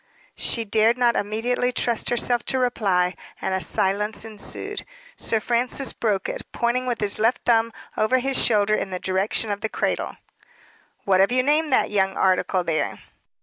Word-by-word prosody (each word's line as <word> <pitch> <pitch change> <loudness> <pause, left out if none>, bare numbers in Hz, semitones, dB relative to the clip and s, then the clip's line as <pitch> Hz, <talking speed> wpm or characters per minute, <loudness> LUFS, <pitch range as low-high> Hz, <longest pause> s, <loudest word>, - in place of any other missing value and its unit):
She 230 -2 0
dared 220 +3 +3
not 240 -1 +3
immediately 240 +4 0
trust 235 -2 0
herself 240 0 0
to 265 - -1
reply, 195 -8 +1 0.3
and - - -2
a 190 - 0
silence 210 +4 0
ensued. 225 - -5 0.3
Sir 225 - -1
Francis 245 +4 -1
broke 205 -4 -1
it, - - -4
pointing 240 +2 -1
with 240 -2 -1
his 205 0 +2
left 225 +3 +2
thumb 230 -1 +3 0.2
over 215 +4 +2
his 265 +1 +1
shoulder 215 -2 +3
in 205 - 0
the 185 - -3
direction 190 +4 -1
of 205 0 -3
the 220 - -2
cradle. - - -2 0.9
"What 190 -2 +3
have 195 +4 +4
you 255 0 +3
named 300 +2 +2
that 255 - +2
young 195 -2 +1
article 185 0 +2
there?" 165 -2 -1
220 Hz, 170 wpm, -23 LUFS, 200-245 Hz, 0.9 s, have